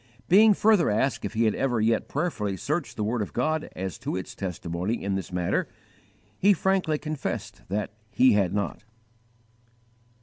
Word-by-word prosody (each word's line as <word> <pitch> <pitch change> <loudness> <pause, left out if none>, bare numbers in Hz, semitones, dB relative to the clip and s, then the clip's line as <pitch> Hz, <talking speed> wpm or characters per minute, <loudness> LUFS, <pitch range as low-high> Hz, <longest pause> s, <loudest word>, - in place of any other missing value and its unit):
Being 210 +3 +6
further 210 -4 +4
asked 115 +6 0
if - - -5
he 115 - +2
had 110 -2 +3
ever 125 -4 0
yet 110 +1 +1
prayerfully 115 - -2
searched 155 - -2
the 105 - -1
word 115 +2 -1
of 105 - -4
God 155 +5 -1
as 95 -3 -5
to - - -3
its 95 - -5
testimony 90 +3 -3
in 100 0 -1
this 95 -1 -4
matter, 90 -1 0 0.7
he 200 +2 +5
frankly 185 -4 +1
confessed 155 -2 -5
that 105 +2 -2 0.2
he 130 +3 +4
had 100 -4 +2
not. 100 +1 -3
115 Hz, 165 wpm, -26 LUFS, 100-155 Hz, 0.7 s, Being